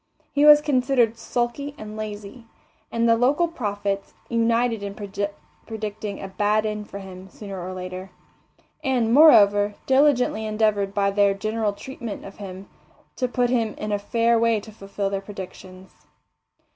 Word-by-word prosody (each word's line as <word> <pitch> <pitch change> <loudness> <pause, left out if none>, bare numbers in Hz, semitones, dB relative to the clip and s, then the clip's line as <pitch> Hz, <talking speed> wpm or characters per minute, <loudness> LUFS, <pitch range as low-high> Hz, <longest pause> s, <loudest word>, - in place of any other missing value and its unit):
He 290 +1 +3
was 295 0 +9
considered 255 -5 +2
sulky 240 +5 -3
and 215 0 -8
lazy, 215 +2 -7 0.4
and 230 0 +1
the 230 - +5
local 275 +9 +2
prophets 205 -9 -3
united 230 -1 +1
in 200 0 -5
predicting 205 +1 -6
a 195 - -6
bad 210 +2 +1
end 210 -1 -4
for - - -7
him 190 -1 -10
sooner 195 -2 -8
or 185 - -5
later; 185 +1 -7 0.7
and, 240 -4 +1
moreover, 205 -8 +6
diligently 265 -5 +3
endeavoured 215 -2 0
by 200 -1 +2
their 200 0 +3
general 215 +1 -1
treatment 230 +1 -7
of 195 - -11
him 195 -1 -8 0.5
to 255 - -1
put 245 0 0
him 230 -4 0
in 210 - -4
a 205 - 0
fair 230 +3 +2
way 230 -1 +2
to 220 - -12
fulfil 200 -1 -4
their 195 -1 -2
predictions. 190 -1 -10
215 Hz, 150 wpm, -23 LUFS, 200-235 Hz, 0.7 s, was